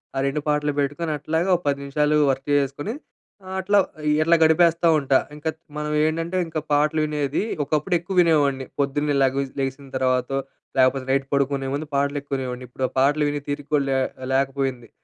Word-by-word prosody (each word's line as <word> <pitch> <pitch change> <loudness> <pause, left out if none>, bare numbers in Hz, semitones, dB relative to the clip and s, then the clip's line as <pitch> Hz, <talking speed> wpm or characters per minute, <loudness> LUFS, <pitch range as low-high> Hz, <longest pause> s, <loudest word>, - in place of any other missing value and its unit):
ఆ - - 0
2 145 +2 -1
పాటలు 150 0 +1
పెట్టుకొని 145 +4 -2
అట్లాగా 160 +5 -1
ఒక 175 - -3
10 140 -1 +2
నిమిషాలు 150 +2 +1 0.2
వర్క్ 135 0 -4
చేసేసుకొని 145 - 0 0.6
ఆహ్, 190 - -5
అట్లా 200 +2 +2 0.4
ఇట్లా 165 +2 +4
గడిపేస్తా 165 +1 +4
ఉంటా. 135 -2 +3 0.2
ఇంకా 150 +2 -3 0.3
మనం 150 0 -3
ఏంటంటే, 165 +3 -1
ఇంకా 160 -1 -3
పాటలు 150 +2 +2
వినేది 150 +1 -1 0.2
ఒకప్పుడు 155 +5 0
ఎక్కువ 185 +3 -6
వినేవాడిని. 145 -5 +2
పొద్దున్నే 145 +1 0
లేగవ 135 +1 +2 0.2
లెగిసిన 135 +1 -3
తర్వాతో 130 +1 0 0.4
లాకపోతే, 130 0 +3
నైట్ 135 0 +1
పడుకునే 140 -1 0
ముందు 150 +2 -4
పాటలు 140 +1 +1
ఎక్కువ 140 0 -4
వినేవాడిని. 125 -1 -5
ఇప్పుడు 130 +1 -2
ఆ - - -26
పాటలు 145 +3 +3
వినే 145 0 -3
తీరిక 145 0 0
లే 135 - +2 0.4
లేకపోయింది. 135 -3 -1
145 Hz, 170 wpm, -23 LUFS, 135-155 Hz, 0.6 s, ఇట్లా